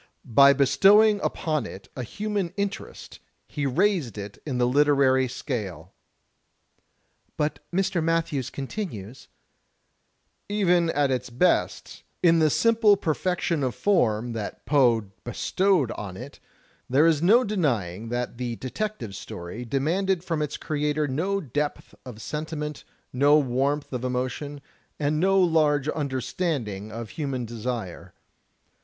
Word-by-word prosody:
By 140 +4 +6
bestowing 195 +11 +5
upon 155 -8 -1
it 95 - -10
a 130 - -4
human 200 - -3
interest, 200 0 -5 0.3
he 145 -2 -2
raised 160 - +1
it 100 0 -7
in 130 -4 -2
the 125 - +3
literary 135 -1 +3
scale." 105 - -5 1.4
But 150 0 -1
Mr. 185 -2 0
Matthews 165 -5 0
continues: 130 - -6 1.2
"Even 180 -5 +2
at 145 -3 +1
its 125 0 -2
best, 125 +10 0 0.2
in 170 -1 +5
the 155 -1 +4
simple 225 +3 +4
perfection 170 -1 -1
of 130 -5 -1
form 120 - +1
that 110 -3 -6
Poe 125 -6 +4 0.2
bestowed 175 - +1
on 95 -3 -6
it, 130 +6 -10 0.5
there 140 +5 +4
is 160 -3 +3
no 220 +9 +5
denying 115 - -1
that 120 0 -3
the 120 -2 -3
Detective 130 - -4
Story 90 +8 -7
demanded 170 - 0
from 165 -4 -2
its 150 0 -3
creator 150 -1 -1
no 180 +9 -1
depth 145 -2 -3
of 115 -4 -9
sentiment, 150 -1 -5 0.3
no 145 +4 +5
warmth 140 +1 0
of 125 -1 -3
emotion, 130 +3 -3 0.4
and 150 +1 0
no 195 +2 +3
large 155 -5 +3
imderstanding 130 - -2
of 115 0 -7
human 135 -5 -3
desire. 115 -4 -5
145 Hz, 125 wpm, -25 LUFS, 125-170 Hz, 1.4 s, By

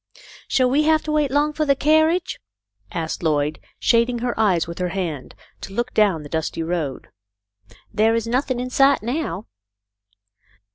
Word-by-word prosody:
" - - -17
Shall 255 -1 +2
we 275 +4 +2
have 315 0 +3
to 305 - -3
wait 300 -2 +1
long 295 +3 +1
for 305 - -1
the 280 -2 +3
carriage? 315 +5 +2 0.3
" 100 0 -39
asked 160 -1 -4
Lloyd, 150 -2 0 0.2
shading 235 +1 +2
her 240 0 -2
eyes 195 -7 +2
with 170 +1 -8
her 180 0 -1
hand 170 -8 -4 0.3
to 195 - -8
look 240 +3 -2
down 195 -8 +2
the - - -8
dusty 160 +1 -3
road. 160 -5 -3 0.8
"There 220 +2 +3
is 230 -1 -1
nothing 255 +1 -1
in 250 0 -4
sight 275 -3 +4
now." 235 - -3
230 Hz, 175 wpm, -22 LUFS, 165-275 Hz, 0.8 s, sight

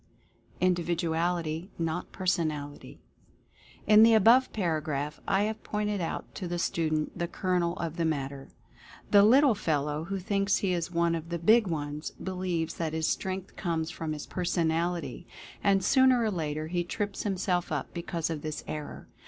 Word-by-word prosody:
INDIVIDUALITY 170 -1 0
NOT 165 +1 -3
PERSONALITY. 155 -6 -2 0.9
In 210 0 +7
the 225 0 +7
above 235 +5 +5
paragraph 155 -6 -2
I 195 0 +3
have 220 +1 -2
pointed 210 -2 -2
out 165 - -4
to 185 - -5
the 175 0 -2
student 155 -2 -1
the 170 - -2
kernel 180 -2 -1
of 165 0 -4
the 170 - 0
matter. 140 -3 -2 0.6
The 205 - +8
"little 260 +5 +6
fellow" 150 -5 -1
who 195 +2 -3
thinks 195 +1 +1
he 190 -2 0
is 170 -1 -2
one 170 -1 +1
of 165 0 -4
the 170 - -2
"big 215 +6 +4
ones" 150 -2 -3
believes 180 -3 -3
that 160 -2 -2
his 160 0 0
strength 190 0 -3
comes 165 -3 -2
from 160 -1 -4
his 150 - -6
Personality, 170 -1 -1 0.4
and 195 -1 +3
sooner 260 -1 +5
or 220 - +1
later 155 -4 -2
he 175 +2 -1
trips 200 +3 -3
himself 185 -3 -1
up - - -3
because 170 -1 -3
of 155 -2 -4
this 155 -1 -5
error. 150 -1 -6
170 Hz, 160 wpm, -29 LUFS, 160-195 Hz, 0.9 s, The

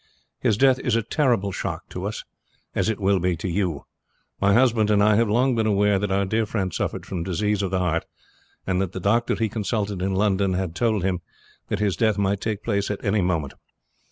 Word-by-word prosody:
"His 105 - +1
death 130 +1 +4
is 125 -3 0
a 115 - +1
terrible 120 -8 +1
shock - - -4
to 90 +2 -4
us, 105 - -5 0.5
as - - 0
it 110 - -2
will 100 -1 +2
be 90 -1 0
to 80 - -4
you. 90 -4 -1 0.5
My 100 0 +3
husband 115 -4 +3
and 105 - +4
myself 105 +1 +4
have 115 -2 +2
long 125 +5 +3
been 110 -2 +1
aware 105 -1 +3
that 105 0 -2
our 100 +1 +2
dear 110 +3 0
friend 95 -5 -2
suffered - - -3
from 90 -3 -4
disease 100 +4 0
of 95 - -1
the 95 - 0
heart, 85 -2 0 0.6
and 95 0 0
that 95 -2 -3
the - - -4
doctor 115 +6 +1
he 115 - 0
consulted 105 -2 -2
in 95 +1 0
London 100 -1 +2
had 90 -2 -2
told 110 -2 0
him 95 -2 0 0.5
that 105 - -1
his 100 -3 0
death 110 +1 +1
might 100 0 0
take 105 -2 -3
place 100 -3 -1
at 105 - -4
any 100 0 +2
moment. 85 -6 -1
100 Hz, 220 wpm, -24 LUFS, 95-110 Hz, 0.6 s, death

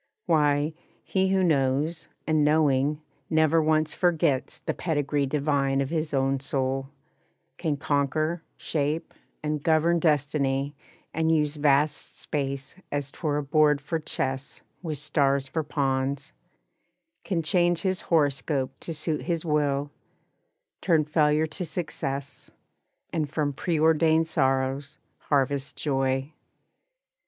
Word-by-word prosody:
Why, 150 -2 +2 0.3
he 190 0 +1
Who 190 0 +2
knows, 150 +1 +1 0.2
and 155 -1 +2
knowing, 150 -1 +2 0.3
never 160 0 +4
once 155 0 +2
forgets 165 -6 +1
The - - -3
pedigree 145 -3 -1
divine 140 -1 +1
of 135 +1 -1
his 155 -2 -1
own 135 0 +1
soul, 135 0 -2 0.7
Can 150 -3 -1
conquer, 155 +3 0 0.2
shape 155 +2 -2 0.3
and 150 -1 -1
govern 165 +2 +3
destiny 145 -2 +1 0.4
And 160 0 +1
use 150 -2 +1
vast 145 0 +1
space 140 -2 -3 0.2
as 145 -1 -2
'twere 150 -3 -2
a 150 - -1
board 150 0 +3
for 160 +3 -3
chess 135 -3 -3 0.2
With 160 -4 -3
stars 140 -2 +1
for 160 +4 -2
pawns; 140 -1 -1 0.9
can 170 -4 -1
change 175 +1 +2
his 190 -1 0
horoscope 140 -3 +1
To 165 - -5
suit 155 0 -2
his 170 -2 -2
will; 145 -2 0 0.9
turn 160 -5 +3
failure 150 0 +3
to 160 +4 -5
success, 140 -5 -4 0.6
And 155 -3 -1
from 150 -1 -1
preordained 160 +1 +3
sorrows, 135 -1 0 0.2
harvest 140 -1 0
joy. 135 0 -1
150 Hz, 120 wpm, -26 LUFS, 140-160 Hz, 0.9 s, never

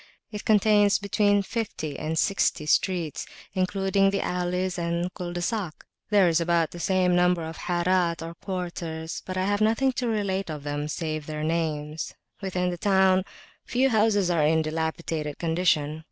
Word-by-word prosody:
It 210 -1 -6
contains 210 -1 +4
between 205 0 +2
fifty 190 - -4
and 160 +1 -2
sixty 195 -4 +1
streets, 170 0 +1 0.3
including 195 +1 +2
the 195 0 -1
alleys 180 0 -1
and 170 +1 -1
culs 175 -2 -6
de 175 - -2
sac. 200 -7 -3 0.2
There 205 -3 +5
is 165 0 +2
about 170 -1 +1
the 175 - -8
same 180 0 +2
number 180 -1 +3
of 160 0 -6
Harat 175 -1 0
or 165 0 -6
quarters; 170 -3 -5
but 185 0 -4
I 185 - +1
have 205 +1 0
nothing 225 +5 +3
to 250 -1 -2
relate 195 -4 -1
of 150 -2 -5
them 145 0 -3
save 155 -1 -4
their 155 -1 -4
names. 155 -1 -2 0.3
Within 180 -2 -1
the 175 - -6
town 190 -1 +3 0.4
few 260 +2 +1
houses 210 -4 +3
are 170 -3 +2
in 160 +2 +3
a - - -2
dilapidated 160 -1 -3
condition. 160 -3 +1
180 Hz, 170 wpm, -26 LUFS, 160-195 Hz, 0.4 s, There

